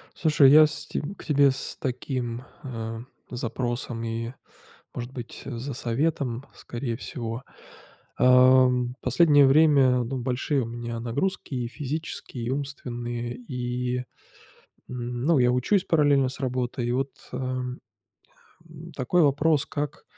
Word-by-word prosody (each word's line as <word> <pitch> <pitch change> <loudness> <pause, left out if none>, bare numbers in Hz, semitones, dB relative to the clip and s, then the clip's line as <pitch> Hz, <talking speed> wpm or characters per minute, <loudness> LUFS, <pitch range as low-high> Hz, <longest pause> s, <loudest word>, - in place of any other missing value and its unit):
Слушай, 150 -4 +5
я 155 +1 +9
с 150 - -3
те - - -3 0.2
к - - -12
тебе 140 -3 +4
с 130 - -4
таким, 125 -2 -3 0.2
ам, 115 -3 -6 0.2
запросом, 120 -1 -3
и 115 +1 -3 0.6
может 120 0 -5
быть 120 -3 -8
за 135 +1 -5
советом, 125 0 -1
скорее 120 -1 -5
всего. 115 0 -5 0.8
Ам, 125 -1 +5
последнее 145 +2 +5
время 135 -4 +5
ну 130 +3 -3
большие 130 +3 0
у - - -3
меня 120 0 -5
нагрузки, 140 +8 -2
и 125 -2 -2
физические 145 -3 -5
и - - -1
умственные, 120 -3 -4
и, 125 0 -3 0.9
м, 120 -1 -4
ну, 165 -3 +4
я 125 -1 +4
учусь 155 - +2
параллельно 145 -5 +3
с 130 - -7
работой, 125 -2 -2
и 120 - 0
вот, 135 +2 0 0.2
ам, 125 0 -3 0.9
ам, 165 +1 -11
такой 140 +6 +1
вопрос: 145 +1 +3
как 145 0 -4
125 Hz, 130 wpm, -26 LUFS, 120-140 Hz, 0.9 s, я